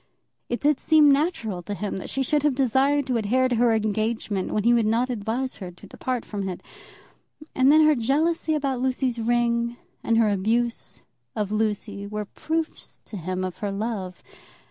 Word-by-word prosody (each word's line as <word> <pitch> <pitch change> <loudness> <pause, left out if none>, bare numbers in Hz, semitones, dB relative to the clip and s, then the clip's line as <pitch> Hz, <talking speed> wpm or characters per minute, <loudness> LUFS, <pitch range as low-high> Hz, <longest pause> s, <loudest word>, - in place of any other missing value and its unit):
It 240 - -1
did 295 -1 +3
seem 305 -2 +5
natural 275 - 0
to 205 +4 -5
him 205 -1 -3
that 190 - -6
she 270 - -1
should 295 +3 +1
have 290 -2 +2
desired 275 +2 +2
to 255 -3 0
adhere 245 +4 +2
to 250 - 0
her 240 0 +4
engagement 215 -2 -1
when 210 - 0
he 235 +2 +5
would 230 -2 +3
not 240 +4 +1
advise 240 +4 -3
her 185 -3 -7
to 180 +3 -14
depart 250 +4 -4
from 200 -2 -4
it. 180 - -7 0.9
And 260 +1 +4
then 310 +1 +6
her 305 - +6
jealousy 310 +6 +1
about 275 -4 -1
Lucy's 255 -2 0
ring, 235 0 +1 0.3
and 230 - +2
her 225 -2 +4
abuse 225 +4 -1 0.3
of 210 -2 -2
Lucy, 210 -1 -2
were 210 0 -4
proofs 320 +9 -4
to - - -7
him 185 +2 -3
of 185 -1 -5
her 205 -1 -2
love. 195 -3 -4
235 Hz, 185 wpm, -25 LUFS, 210-265 Hz, 0.9 s, then